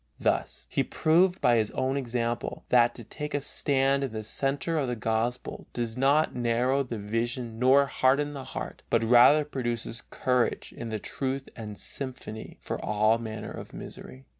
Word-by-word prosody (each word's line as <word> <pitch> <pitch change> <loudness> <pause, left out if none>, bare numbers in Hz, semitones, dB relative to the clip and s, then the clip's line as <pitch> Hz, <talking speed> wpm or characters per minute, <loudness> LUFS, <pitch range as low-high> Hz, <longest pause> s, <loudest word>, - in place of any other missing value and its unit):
Thus - - -1
he - - 0
proved 180 +4 +2
by 120 -1 +5
his 110 -2 +1
own 130 +1 +1
example 120 -3 -2
that 120 -1 +4
to 120 - -9
take 150 +6 -5
a - - +2
stand 135 -1 +1
in 135 - -2
the 110 0 -4
center 140 +8 -1
of 135 - 0
the 125 - -1
Gospel 115 +2 -2
does 115 -2 -3
not 140 +4 +3
narrow 125 +3 +1
the 120 -4 -4
vision 115 +2 -3
nor 135 +3 +6
harden 140 +2 +2
the 135 -2 -7
heart, - - -6
but 115 -1 +2
rather 125 +6 +6
produces 120 -4 -3
courage 125 -2 0
in 115 - -6
the 110 - -2
truth 135 +5 -3
and 105 -3 -7
sympathy 130 -5 -6
for - - -4
all 110 +2 +3
manner 110 -2 -6
of - - -9
misery. 65 +1 -9
125 Hz, 170 wpm, -28 LUFS, 115-135 Hz, -, nor